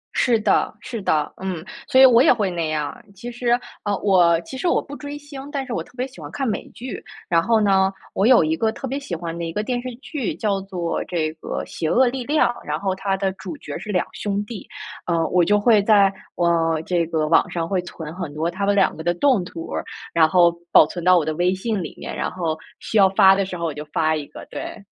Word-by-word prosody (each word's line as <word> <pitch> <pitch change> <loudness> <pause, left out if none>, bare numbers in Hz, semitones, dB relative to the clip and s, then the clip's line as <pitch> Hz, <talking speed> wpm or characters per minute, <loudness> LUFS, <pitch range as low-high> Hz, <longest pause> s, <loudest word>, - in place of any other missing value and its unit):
是 235 -3 +3
的， 210 - +2
是 230 0 -6
的， 155 -5 0
嗯。 185 -4 -4 0.2
所 260 - +4
以 265 - +10
我 245 -1 +7
也 305 - +6
会 210 -6 +1
那 170 -3 -2
样 150 -2 -1
儿。 - - -15
其 240 +6 -7
实， 240 0 +1 0.2
呃， 205 -1 0
我 175 -4 +4
其 215 +10 -10
实 350 - -1
我 - - +3
不 285 - -9
追 290 0 -7
星， 285 -1 -10
但 275 -3 -3
是 245 - -5
我 - - -2
特 - - -21
别 255 - -1
喜 265 - -14
欢 - - -7
看 270 -2 -2
美 215 - -3
剧。 245 -3 -8 0.2
然 170 -1 +3
后 225 +5 +2
呢， 195 -2 +3 0.2
我 195 - +1
有 250 -10 +6
一 160 +1 +1
个 220 +5 +1
特 265 - -6
别 275 +3 -3
喜 185 -11 -5
欢 165 0 -5
的 170 - -4
一 165 - -3
个 210 +5 -2
电 245 +1 -2
视 255 - -5
剧 270 0 -4
叫 200 -3 -1
做 180 -3 -3
这 160 -3 -2
个 160 - -5
《邪 160 - -3
恶 260 +1 +4
力 255 0 -2
量》， 300 +3 +3 0.2
然 150 +1 -2
后 190 0 -1
它 195 0 -1
的 195 -1 0
主 180 -5 -8
角 145 - -7
是 210 - -6
2 180 -3 +1
兄 205 0 -2
弟， 215 -3 -8 0.4
呃， 165 -2 +1
我 180 -1 +3
就 205 +4 +3
会 215 -1 +5
在， 200 -2 +4 0.2
呃， 165 -2 +1
这 175 -2 +1
个 155 -2 0
网 160 - +3
上 165 -1 -2
会 185 -1 0
存 160 -3 -8
很 175 -6 -5
多 160 +3 -1
他 200 +3 -2
们 205 - +2
2 195 -2 +3
个 160 - -7
的 175 +1 +1
动 255 -5 +3
图 165 -2 -8
儿， - - -2 0.3
然 160 -1 +5
后 175 -2 +5 0.2
保 - - +8
存 175 - -7
到 185 0 +6
我 160 - +1
的 155 - -1
微 180 +2 +2
信 210 0 -2
里 160 - -7
面， - - -6
然 - - -2
后 165 -3 -2 0.2
需 225 - -2
要 190 -1 +6
发 190 0 +6
的 195 -1 0
时 180 -2 -6
候 170 - -3
我 155 - -2
就 150 +1 -6
发 155 +1 0
一 150 - -4
个， - - -11
对。 - - -7
190 Hz, 270 characters per minute, -22 LUFS, 165-230 Hz, 0.4 s, 以